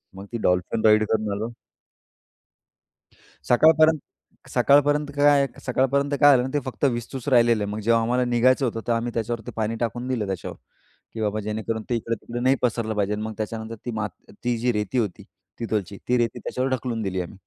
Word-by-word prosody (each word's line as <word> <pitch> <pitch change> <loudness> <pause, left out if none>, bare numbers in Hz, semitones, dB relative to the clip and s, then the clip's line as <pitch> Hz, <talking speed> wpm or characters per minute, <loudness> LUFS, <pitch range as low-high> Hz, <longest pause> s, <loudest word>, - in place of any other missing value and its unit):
मग 95 - -9
ते - - -1
dolphin 90 +5 0
ride 110 0 +6
करून 110 -2 0
आलो. 110 +4 -3 2.0
सकाळपर्यंत 155 +4 +5 0.5
सकाळपर्यंत 145 +1 +3
काय 145 -1 +5 0.2
सकाळपर्यंत 140 +3 +1
काय 145 -2 +8
झालं 130 +2 -1
ते 145 - +2
फक्त 130 +2 -4
विस्तूच 125 +1 -2
राहिलेलं. 120 -4 +4
मग 105 +1 -4
जेव्हा 115 +2 +3
आम्हाला 125 +2 +1
निघायचं 125 +3 +3
होतं 115 -1 -3
तर 120 - +1
आम्ही 115 +1 -1
त्याच्यावरती 115 -1 -3
पाणी 110 +1 -1
टाकून 120 +1 -2
दिलं 115 -5 -1
त्याच्यावर. 95 -3 -5 0.6
की 110 - -5
बाबा 105 0 -1
जेणेकरून 110 +1 -3
ते - - +2
इकडे-तिकडे 115 +1 -4
नाही 130 +2 +3
पसरलं 115 -2 0
पाहिजे. 105 0 0
मग 110 +1 -4
त्याच्यानंतर 110 +1 -4
ती - - -1
माती 105 -5 -6
ती 120 -1 +1
जी 125 +1 +1
रेती 105 +3 -2
होती 105 -6 -2 0.4
तिथलची 105 -4 -2
ती 125 - +3
रेती 115 -1 0
त्याच्यावर 130 +1 -2
ढकलून 120 -3 -2
दिली 95 -2 -2
आम्ही. 90 +3 -6
115 Hz, 175 wpm, -24 LUFS, 110-130 Hz, 2.0 s, काय